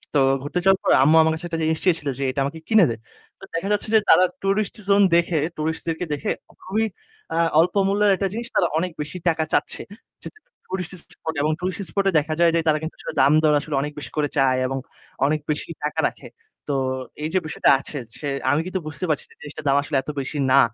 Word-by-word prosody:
তো -, -, +5 dB, 0.2 s
ঘুরতে 145 Hz, +5 st, -2 dB
যাওয়ার 195 Hz, 0 st, +5 dB
পরে -, -, +4 dB
আম্মু 155 Hz, +3 st, +5 dB
আমার 160 Hz, 0 st, +3 dB
কাছে 160 Hz, +2 st, -6 dB
একটা 165 Hz, -, -3 dB
জিনিস 160 Hz, 0 st, 0 dB
চেয়েছিল 165 Hz, -5 st, +1 dB
যে, 140 Hz, -, -1 dB
"এটা 140 Hz, -, -4 dB
আমাকে 160 Hz, +4 st, -5 dB
কিনে 220 Hz, -4 st, +6 dB
দে।" 115 Hz, -, -2 dB, 0.4 s
তো -, -, -17 dB
দেখা 170 Hz, +4 st, -2 dB
যাচ্ছে 205 Hz, -, -1 dB
যে -, -, +8 dB
তারা 185 Hz, -, +7 dB, 0.2 s
tourist 195 Hz, +2 st, 0 dB
zone 200 Hz, 0 st, +6 dB
দেখে 170 Hz, -1 st, +2 dB, 0.2 s
tourist-দেরকে 160 Hz, +2 st, -2 dB
দেখে 145 Hz, -, -3 dB, 0.3 s
খুবই, 215 Hz, +4 st, 0 dB, 0.5 s
আ -, -, 0 dB, 0.2 s
অল্প 170 Hz, +2 st, +3 dB
মূল্যের 205 Hz, +1 st, +3 dB
একটা 195 Hz, +1 st, -1 dB
জিনিস 235 Hz, +1 st, -4 dB
তারা 175 Hz, -, +4 dB
অনেক 180 Hz, +2 st, -1 dB
বেশি 150 Hz, +5 st, -6 dB
টাকা 160 Hz, -1 st, +2 dB
চাচ্ছে। -, -, 0 dB, 0.4 s
যেহেতু 430 Hz, -, -10 dB, 0.3 s
tourist 185 Hz, -1 st, -3 dB, 0.2 s
spot 160 Hz, -, -5 dB
এবং 155 Hz, +2 st, +2 dB
tourist 185 Hz, +2 st, -3 dB
spot 200 Hz, -1 st, -1 dB
এ -, -, +1 dB
দেখা 155 Hz, +1 st, -3 dB
যায় 170 Hz, -1 st, +5 dB
যে -, -, +3 dB
তারা 155 Hz, -, +4 dB
কিন্তু 160 Hz, +1 st, -5 dB
আসলে -, -, -6 dB
দামদর 150 Hz, +3 st, +4 dB
আসলে 145 Hz, 0 st, -4 dB
অনেক 150 Hz, +1 st, -3 dB
বেশি -, -, -8 dB
করে 145 Hz, -1 st, +1 dB
চায় 130 Hz, -2 st, +3 dB
এবং 135 Hz, -, -3 dB, 0.5 s
অনেক 155 Hz, +2 st, +1 dB
বেশি 150 Hz, +2 st, -2 dB
টাকা 150 Hz, -, -2 dB
রাখে। -, -, -14 dB, 0.4 s
তো 140 Hz, -, +1 dB, 0.5 s
এই 155 Hz, -, -1 dB
যে 185 Hz, -, +3 dB
বিষয়টা 150 Hz, -, +1 dB
আছে 145 Hz, -, -6 dB, 0.2 s
সে 145 Hz, -, -4 dB, 0.2 s
আমি 145 Hz, +2 st, +2 dB
কিন্তু 185 Hz, +1 st, -3 dB
বুঝতে 155 Hz, +4 st, -4 dB
পারছি 150 Hz, -4 st, 0 dB
যে -, -, -18 dB
জিনিসটার 150 Hz, +1 st, -9 dB
দাম 140 Hz, 0 st, +4 dB
আসলে 145 Hz, 0 st, -4 dB
এত 135 Hz, -, -10 dB
বেশি 135 Hz, +2 st, -4 dB
না। 140 Hz, -, +7 dB
160 Hz, 225 wpm, -23 LUFS, 150-185 Hz, 0.5 s, যে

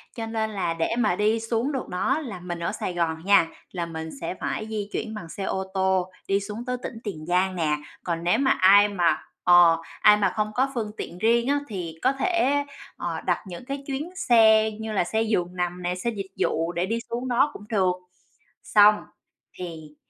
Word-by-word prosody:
Cho 225 Hz, -, -4 dB
nên 220 Hz, -1 st, -1 dB
là 185 Hz, -5 st, -1 dB
để 165 Hz, +7 st, -1 dB
mà 210 Hz, -6 st, +2 dB
đi 215 Hz, +3 st, +2 dB
xuống 230 Hz, +4 st, -1 dB
được 265 Hz, -3 st, -4 dB
đó 185 Hz, +11 st, 0 dB
là 230 Hz, -, -6 dB
mình 175 Hz, -1 st, -5 dB
ở 170 Hz, -, -2 dB
Sài 180 Hz, -, -4 dB
Gòn 165 Hz, -1 st, -2 dB
nha, 200 Hz, -4 st, +5 dB, 0.2 s
là 175 Hz, -2 st, -3 dB
mình 160 Hz, -1 st, -6 dB
sẽ -, -, -3 dB
phải 215 Hz, -, -3 dB
di 210 Hz, -2 st, -4 dB
chuyển 220 Hz, -, -3 dB
bằng 170 Hz, -6 st, -8 dB
xe 195 Hz, -, -6 dB
ô 190 Hz, 0 st, -1 dB
tô, 190 Hz, -1 st, +1 dB, 0.2 s
đi 195 Hz, 0 st, +2 dB
xuống 210 Hz, +4 st, -6 dB
tới 250 Hz, -1 st, -2 dB
tỉnh -, -, -6 dB
Tiền 170 Hz, -8 st, -6 dB
Giang 185 Hz, +2 st, +1 dB
nè. 155 Hz, -4 st, +1 dB, 0.3 s
Còn 170 Hz, -1 st, -2 dB
nếu 180 Hz, +7 st, +2 dB
mà 270 Hz, -1 st, +3 dB
ai 200 Hz, +2 st, +6 dB
mà 175 Hz, -4 st, +2 dB, 0.3 s
ờ, 175 Hz, -2 st, +7 dB, 0.2 s
ai 210 Hz, 0 st, +7 dB
mà 205 Hz, -, +2 dB
không 215 Hz, 0 st, -1 dB
có 265 Hz, +2 st, +1 dB
phương 220 Hz, -4 st, -3 dB
tiện 170 Hz, -, -6 dB
riêng 235 Hz, +4 st, +2 dB
á, 285 Hz, +1 st, +2 dB
thì 180 Hz, -6 st, -5 dB
có 260 Hz, -, +3 dB
thể, 285 Hz, -2 st, +1 dB, 0.3 s
ờ, 170 Hz, -2 st, -3 dB
đặt 180 Hz, -, -1 dB
những 180 Hz, +6 st, -8 dB
cái 275 Hz, +1 st, -5 dB
chuyến 285 Hz, +4 st, -3 dB
xe 220 Hz, -, +5 dB
như 220 Hz, +1 st, -6 dB
là 205 Hz, -, +1 dB
xe 220 Hz, +5 st, -1 dB
giường 185 Hz, -5 st, -1 dB
nằm 180 Hz, 0 st, -2 dB
nè, 175 Hz, +1 st, -1 dB
xe 185 Hz, +6 st, -2 dB
dịch 195 Hz, -3 st, -6 dB
vụ 165 Hz, +2 st, 0 dB
để 175 Hz, +1 st, -1 dB
đi 225 Hz, +4 st, -1 dB
xuống 245 Hz, +2 st, -3 dB
đó 245 Hz, +4 st, +3 dB
cũng 205 Hz, -, -10 dB
được. 190 Hz, -5 st, +2 dB, 0.7 s
Xong 210 Hz, 0 st, +6 dB, 0.6 s
thì 160 Hz, -4 st, -8 dB
200 Hz, 215 wpm, -25 LUFS, 175-225 Hz, 0.7 s, ờ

